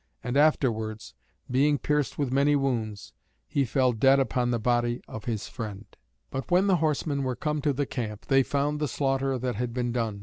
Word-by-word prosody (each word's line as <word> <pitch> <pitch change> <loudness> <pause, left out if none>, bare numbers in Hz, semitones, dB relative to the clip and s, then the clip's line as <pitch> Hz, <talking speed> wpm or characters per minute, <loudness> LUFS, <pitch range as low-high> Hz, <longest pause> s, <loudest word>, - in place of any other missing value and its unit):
And 125 +2 -3
afterwards, 110 -7 +1 0.4
being 145 +3 +3
pierced 150 0 -1
with 140 -3 -1
many 140 +2 +4
wounds, 110 -8 -2 0.3
he 140 -2 +1
fell 130 +1 +2
dead 135 +4 +4
upon 125 -2 0
the 120 - +1
body 120 +1 +1
of 110 -1 -8
his 110 -4 -3
friend. 105 -4 -7 0.5
But 135 +4 -4
when 180 +2 +4
the 190 -3 +4
horsemen 150 -2 0
were 130 -2 -1
come 150 +2 -2
to 145 - +2
the 140 +1 -1
camp, 110 -6 -5
they 135 -1 +4
found 145 +3 -1
the 150 - 0
slaughter 135 0 0
that 125 0 -2
had 120 0 -3
been 120 -1 -1
done. 115 -4 -2
130 Hz, 195 wpm, -27 LUFS, 120-145 Hz, 0.5 s, many